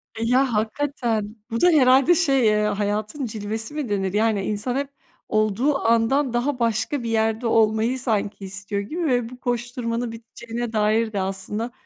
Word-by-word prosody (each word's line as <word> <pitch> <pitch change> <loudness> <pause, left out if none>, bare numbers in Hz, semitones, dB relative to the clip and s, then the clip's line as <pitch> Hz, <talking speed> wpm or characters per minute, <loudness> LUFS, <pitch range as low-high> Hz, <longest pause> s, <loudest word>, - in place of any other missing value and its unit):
E, 225 - -3
ya 250 +2 +2
hakikaten 220 -1 -1 0.2
bu 230 - -2
da - - +6
herhâlde 270 +1 +5
şey, 275 -7 +3
eee, 210 -1 +3
"hayatın 210 +6 -2
cilvesi" 220 +3 -4
mi 300 -6 -3
denir? 195 -2 -1
Yani, 215 -1 +1
insan 215 +4 -2
hep 275 0 -2 0.4
olduğu 215 +7 +1
andan 235 +3 +2
daha 250 +2 0
başka 230 +3 0
bir 230 - -3
yerde 225 +1 0
olmayı 225 +3 +2
sanki 210 -5 -2
istiyor 200 +1 -4
gibi 325 - -4
ve 245 -4 +1
bu 250 0 -12
koşturmanın 240 -1 -2
biteceğine 230 +1 -6
dair 215 +1 +1
de 200 - -1
aslında, 195 +5 -4
230 Hz, 160 wpm, -23 LUFS, 215-255 Hz, 0.4 s, da